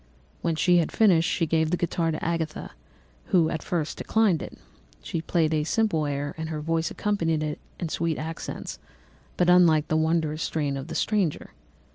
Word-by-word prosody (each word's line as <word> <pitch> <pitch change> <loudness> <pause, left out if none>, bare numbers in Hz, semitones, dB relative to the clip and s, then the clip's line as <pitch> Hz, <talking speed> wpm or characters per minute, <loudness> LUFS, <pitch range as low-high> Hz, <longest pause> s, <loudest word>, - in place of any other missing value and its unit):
"When 165 - 0
she 175 +3 +4
had 170 - +1
finished, 185 -6 +4
she 170 - +1
gave 160 0 +1
the 175 - +1
guitar 170 -1 0
to 155 - -3
Agatha, 165 -2 -2 0.5
who 170 -4 +3
at 160 - -3
first 160 -4 -3
declined 215 -8 +2
it. - - -8 0.5
She 165 - -3
played 165 -1 +1
a 155 -1 +1
simple 160 -4 +1
air, 145 0 -3
and 160 0 -4
her 155 -1 -3
voice 165 +1 -1
accompanied 165 -7 0
it 150 -1 -3 0.2
in 170 - -3
sweet 165 0 -1
accents, 160 +1 -6 0.6
but 180 - +2
unlike 170 -4 +5
the 155 - +2
wondrous 160 -1 0
strain 145 -4 -1
of 135 0 -5
the - - -6
stranger. 200 -8 0
160 Hz, 180 wpm, -26 LUFS, 155-175 Hz, 0.6 s, unlike